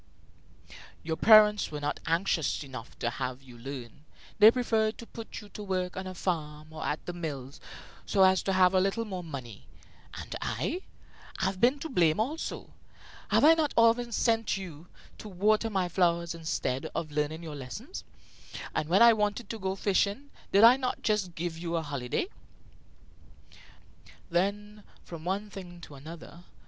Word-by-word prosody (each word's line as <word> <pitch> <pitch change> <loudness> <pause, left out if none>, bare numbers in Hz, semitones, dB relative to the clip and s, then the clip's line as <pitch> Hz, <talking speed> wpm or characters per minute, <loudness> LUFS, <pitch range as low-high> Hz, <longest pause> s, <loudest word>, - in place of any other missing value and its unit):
"Your 160 0 -2
parents 210 +1 +6
were 150 - -5
not 145 0 -2
anxious 165 -3 0
enough 130 -4 -10
to 120 - -1
have 130 +2 -4
you 125 -2 -14
learn. 125 +1 -8 0.4
They 215 0 +10
preferred 225 -3 +1
to 235 - -9
put 230 0 -9
you 210 - -14
to 210 - -9
work 185 -3 -2
on 190 0 -5
a 185 - -7
farm 155 -3 -3
or 155 - -6
at 150 - -3
the 175 - -4
mills, 145 -5 -6 0.5
so 195 - +4
as 190 0 +5
to 195 - -1
have 185 0 +5
a 185 - +4
little 195 +5 0
more 185 -4 -5
money. 130 - -8 0.5
And - - -7
I? 365 - -2 0.6
I've 190 -1 -1
been 255 +4 +4
to - - -3
blame 170 -7 +3
also. 290 +9 -3 0.6
Have - - +4
I 320 - +9
not 315 -3 0
often 230 +1 +4
sent 225 -2 +1
you 175 -4 -9 0.3
to 215 - -8
water 215 +4 +2
my 190 -4 0
flowers 170 -1 +1
instead 160 -5 -2
of 155 -2 -3
learning 150 +2 -2
your 155 -3 -6
lessons? 175 - -7 0.7
And 155 - -2
when 195 +6 +6
I 235 -1 +9
wanted 210 +2 -1
to 225 - -6
go 190 0 -2
fishing, 200 +7 0 0.2
did 200 +2 +5
I 240 +3 +9
not 255 -2 -3
just 205 -5 0
give 165 0 -4
you 170 0 -3
a 165 - 0
holiday?" 140 - -2 2.1
Then, 205 +4 -1 0.2
from 165 -2 -9
one 200 +3 -2
thing 175 -3 -9
to 150 - -11
another, 160 +5 -10
M. - - -17
185 Hz, 170 wpm, -29 LUFS, 155-215 Hz, 2.1 s, They